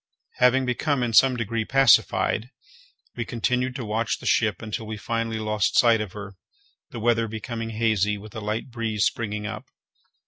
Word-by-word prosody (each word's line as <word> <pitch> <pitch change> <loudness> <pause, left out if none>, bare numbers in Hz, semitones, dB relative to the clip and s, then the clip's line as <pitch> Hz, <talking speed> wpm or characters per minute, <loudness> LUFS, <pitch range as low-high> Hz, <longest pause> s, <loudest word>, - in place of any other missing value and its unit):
Having 130 +1 +4
become 130 +2 0
in 115 -2 -2
some 130 +2 +5
degree 115 0 -2
pacified, 125 -1 +3 0.7
we 120 - -2
continued 125 +3 -1
to 125 - -5
watch 110 +2 -1
the - - -13
ship 105 -5 +2
until 110 +1 -5
we 110 0 -5
finally 115 +2 -2
lost 105 -1 0
sight 115 -2 +5
of 105 -4 -6
her, 100 -2 -9 0.5
the - - -7
weather 115 0 +2
becoming 115 +1 -5
hazy, 110 -2 +1
with 105 +1 -12
a 110 - -5
light 110 +4 -4
breeze 110 -3 -1
springing 105 -2 -2
up. 110 - -6
115 Hz, 170 wpm, -24 LUFS, 105-120 Hz, 0.7 s, some